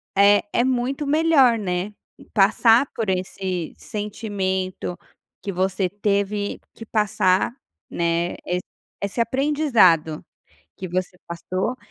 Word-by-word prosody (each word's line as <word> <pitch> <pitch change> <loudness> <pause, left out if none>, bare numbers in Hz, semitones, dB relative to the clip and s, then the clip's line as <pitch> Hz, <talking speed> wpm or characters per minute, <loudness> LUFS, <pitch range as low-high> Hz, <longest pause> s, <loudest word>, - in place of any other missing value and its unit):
é 200 +1 +6
é 240 - +3
muito 260 +3 -1
melhor, 290 -6 +4
né, 190 0 -3 0.4
passar 225 +5 +5
por 220 -4 -2
esse 185 -2 -3
sentimento 195 -4 -3 0.4
que 200 - -4
você 190 0 0
teve 205 +1 -1
que 225 - -10
passar, 205 -3 +2 0.4
né, 170 0 0
esse 180 0 -1 0.4
esse 200 +4 -1
aprendizado 230 - +3 0.5
que 185 - -7
você 180 +1 -3
passou 185 +7 -3
200 Hz, 105 wpm, -22 LUFS, 185-230 Hz, 0.5 s, é